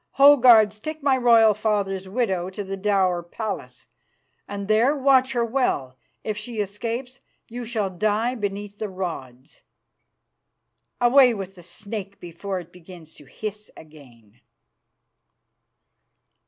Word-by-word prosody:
Ho! 285 +1 +8
guards, 220 -5 +5
take 310 +5 -7
my 275 -2 +3
royal 230 -3 +5
father's 200 -3 -1
widow 190 -5 -1
to 195 +2 -6
the 195 0 -5
dower 190 -3 +1
palace, 205 +5 -6 0.6
and 200 -1 -6
there 230 +7 +3
watch 265 -1 +3
her 240 -2 +1
well. 220 - -1 0.3
If 215 - -3
she 220 +2 -7
escapes, 230 +6 -4 0.3
you 245 +1 -7
shall 215 -4 -2
die 215 +6 0
beneath 205 -2 -5
the 215 - -3
rods. 145 -9 -7 1.4
Away 245 0 +5
with 195 -2 -6
the 180 - -15
snake 200 +3 -7
before 180 +3 -5
it 175 -1 -12
begins 175 -2 -13
to 145 - -15
hiss 210 +9 -7
again." 125 -8 -17
205 Hz, 125 wpm, -23 LUFS, 185-235 Hz, 1.4 s, Ho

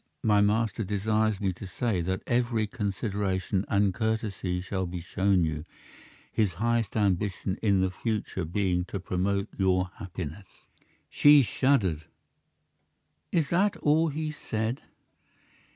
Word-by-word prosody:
My 105 -2 +4
master 110 +1 +1
desires 105 +1 0
me 95 -3 0
to 95 +2 -9
say 100 0 -1
that 95 +2 -2
every 120 -2 +1
consideration 100 -3 -2
and 100 -2 +2
courtesy 110 -4 -1
shall 95 0 -3
be 90 +1 -5
shown 95 +2 +1
you, 75 -2 -2 0.7
his 105 -5 +1
highest 115 +2 0
ambition 100 -1 0
in 100 -3 +3
the 95 0 +1
future 105 -2 -3
being 90 +1 0
to 100 - -5
promote 95 +2 -1
your 95 -1 +2
happiness." 95 -1 -7 0.6
She 145 -1 +6
shuddered. 105 - +1 1.3
"Is 160 -5 +1
that 195 +4 +2
all 155 +3 +3
he 155 +1 -3
said?" 115 -3 -3
100 Hz, 125 wpm, -28 LUFS, 95-110 Hz, 1.3 s, She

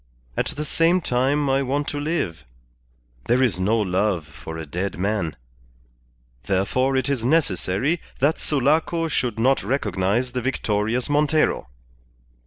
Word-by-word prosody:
At - - 0
the 150 +1 -4
same 165 +4 +3
time 140 0 +1
I 135 0 +2
want 140 +2 -1
to 145 - -3
live. 145 - -2 0.8
There 125 +2 +3
is 100 -8 +1
no 105 +5 +2
love 95 -4 0
for 80 +1 -9
a 80 - -5
dead 90 +7 -3
man. 95 -5 -1 1.1
Therefore 130 - +1
it 130 - 0
is 140 -5 -1
necessary 130 - +1 0.2
that 145 +5 +2
Sulaco 155 +4 +1
should 125 -7 -1
not 130 +4 +3
recognize 105 0 0
the 125 - -2
victorious 115 -1 0
Montero." 150 - +2
125 Hz, 135 wpm, -23 LUFS, 100-145 Hz, 1.1 s, same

